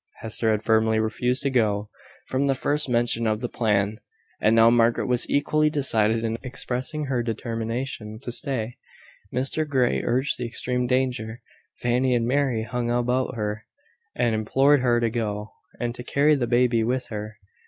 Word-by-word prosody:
Hester 110 0 0
had 110 -1 +1
firmly 110 0 +3
refused 125 +4 0
to 140 - 0
go, 105 -4 0 0.3
from 135 +2 0
the 135 - +2
first 145 +1 0
mention 120 -1 +1
of 110 -1 0
the 120 - -3
plan; 105 -2 0 0.4
and 110 +1 +4
now 115 0 +6
Margaret 115 0 +3
was 125 -2 +1
equally 155 +2 +2
decided 115 -7 +1
in 115 0 -2
expressing 130 +3 -3
her 130 -3 0
determination 115 0 -4
to 120 - -4
stay. 120 -3 -2 0.5
Mr 135 +5 0
Grey 130 -4 +1
urged 130 +3 +1
the 125 - -2
extreme 125 +1 -2
danger: 125 -3 -1 0.3
Fanny 125 +1 +1
and 115 -1 +1
Mary 130 -4 +1
hung 120 +1 -3
about 125 +1 0
her, 105 -1 -4 0.5
and 120 -2 +1
implored 135 +7 +3
her 120 -2 +2
to 115 -1 0
go, 105 -2 -3 0.3
and 120 -1 -2
to 125 - -8
carry 145 +4 +3
the 130 -5 0
baby 120 -1 +2
with 125 +2 -1
her. 105 0 -6
120 Hz, 165 wpm, -24 LUFS, 110-130 Hz, 0.5 s, now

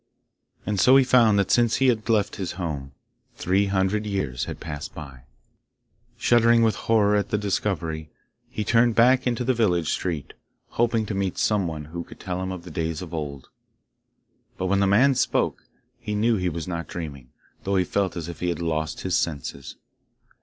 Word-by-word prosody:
And 105 -2 -1
so 130 +6 +7
he 135 - +6
found 115 -5 +4
that 100 - +1
since 120 -1 +3
he 135 0 +3
had 110 -3 +1
deft 105 -3 0
his 95 -3 -4
home, 75 -7 -5 0.4
three 95 +3 +1
hundred 100 +2 0
years 95 -12 -2
had - - -7
passed 75 -2 -7
by. 70 -4 -10 0.9
Shuddering 115 0 +4
with 110 -1 +3
horror 105 -2 +2
at 105 - 0
his 105 -1 0
discovery 85 -6 -2 0.4
he 120 -4 -3
turned 115 +1 +3
back 125 +2 +4
into 125 0 0
the 130 +1 +2
village 90 -9 +1
street, 85 -6 -3 0.4
hoping 115 -1 +1
to 105 - -4
meet 95 -2 -2
some 105 -4 +1
one 75 -2 -5
who 85 +3 -6
could - - -14
tell 90 -1 -4
him 95 0 -3
of 90 -2 -7
the 90 - -10
days 80 +1 -3
of 85 -1 -10
old. 70 -4 -5 1.1
But 95 - -2
when 100 +1 +2
the 100 - +3
man 125 +8 +5
spoke, - - 0 0.3
he 105 -1 -4
knew 115 +2 +2
he 90 -1 0
was 85 0 -5
not 85 -2 -4
dreaming, 75 -9 -7 0.3
though 100 0 -1
he 95 - +3
felt 95 -2 -1
as 85 -1 -5
if 85 - -8
he 90 - -1
had 85 - -2
lost 80 -2 -2
his 95 -2 -1
senses. 70 -3 -3
95 Hz, 190 wpm, -24 LUFS, 80-110 Hz, 1.1 s, so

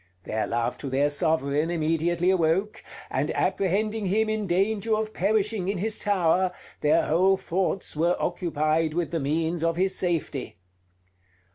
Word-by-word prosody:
Their 110 +3 -2
love 120 +1 -2
to 140 - -5
their 140 +3 +1
sovereign 150 0 0
immediately 170 +2 +1
awoke; 185 +4 0 0.3
and - - -1
apprehending 210 +2 0
him 215 +3 +1
in 215 -2 -1
danger 205 +5 +1
of 215 0 -3
perishing 205 -1 0
in 200 - -1
his 215 +4 +1
tower, 185 -2 +2 0.3
their 150 +2 +3
whole 190 +4 +3
thoughts 185 0 -2
were 170 +3 +1
occupied 160 -2 0
with 175 -1 -1
the 165 - -1
means 160 +3 -1
of 165 0 +1
his 190 +2 +1
safety. 165 -6 -2
175 Hz, 145 wpm, -26 LUFS, 160-195 Hz, 0.3 s, their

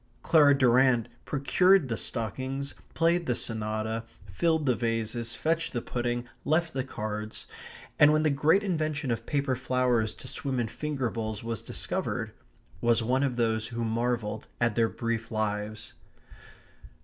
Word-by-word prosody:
Clara 145 -3 +6
Durrant 125 -2 +4 0.2
procured 180 +4 +3
the 115 - -1
stockings, 130 +7 -3 0.2
played 170 +1 +2
the 125 - +1
sonata, 110 0 -2 0.2
filled 160 - +1
the 130 - +4
vases, 115 0 -2
fetched 165 +1 0
the 120 - -1
pudding, 120 0 -2 0.2
left 160 +2 +1
the 130 - -1
cards, 110 -4 -5 0.5
and 150 0 +8
when 155 0 +3
the 155 - +3
great 155 +8 +3
invention 155 -7 -1
of 115 0 -3
paper 140 -2 0
flowers 125 -3 +1
to - - -10
swim 135 -3 -3
in 120 - 0
finger 140 -5 -2
bowls 110 -2 -4
was 115 -2 -3
discovered, - - -3 0.5
was 120 -1 +3
one 130 +4 +1
of 135 -3 0
those 110 -2 0
who 115 -1 -4
most 110 -1 -1
marvelled 115 -2 -1
at 120 -2 +2
their 115 0 +2
brief 115 -1 -3
lives. 105 -1 -3
120 Hz, 150 wpm, -28 LUFS, 115-140 Hz, 0.5 s, and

